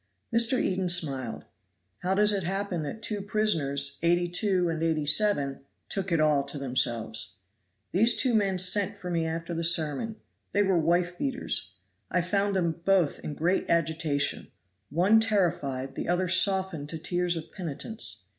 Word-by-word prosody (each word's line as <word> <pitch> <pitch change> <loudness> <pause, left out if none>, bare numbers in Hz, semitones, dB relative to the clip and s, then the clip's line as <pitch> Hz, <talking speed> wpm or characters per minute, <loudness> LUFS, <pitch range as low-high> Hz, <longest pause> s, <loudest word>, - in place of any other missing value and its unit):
Mr. 235 +2 +3
Eden 185 -1 0
smiled. 140 -9 0 0.5
"How 185 +2 0
does 210 +1 +4
it 200 - 0
happen 190 -1 -2
that 155 +9 -6
two 210 -2 -3
prisoners, 145 -10 0
82 175 +2 +2
and 165 -1 -2
87, 155 -1 +1 0.3
took 195 -2 -2
it 165 - +2
all 150 -2 +3
to 145 - -2
themselves? 115 -6 -2 0.6
These 225 +6 +3
two 255 -3 +2
men 200 -4 +2
sent 185 +2 +3
for 180 - -6
me 165 -1 0
after 165 +1 -4
the 165 0 -3
sermon; 165 +5 +1 0.4
they 205 - +3
were 190 -3 +2
wife 175 +2 0
beaters. 265 -2 -1 0.3
I 180 - +1
found 200 +3 0
them 170 -2 -1
both 190 -6 +2
in 150 - -6
great 175 +6 0
agitation. 155 -3 0 0.4
One 185 +9 +4
terrified, 170 -11 0
the - - -5
other 180 +1 +1
softened 185 -4 +1
to 160 - -4
tears 175 +2 0
of 160 0 -8
penitence. 150 - -5
175 Hz, 155 wpm, -27 LUFS, 155-195 Hz, 0.6 s, does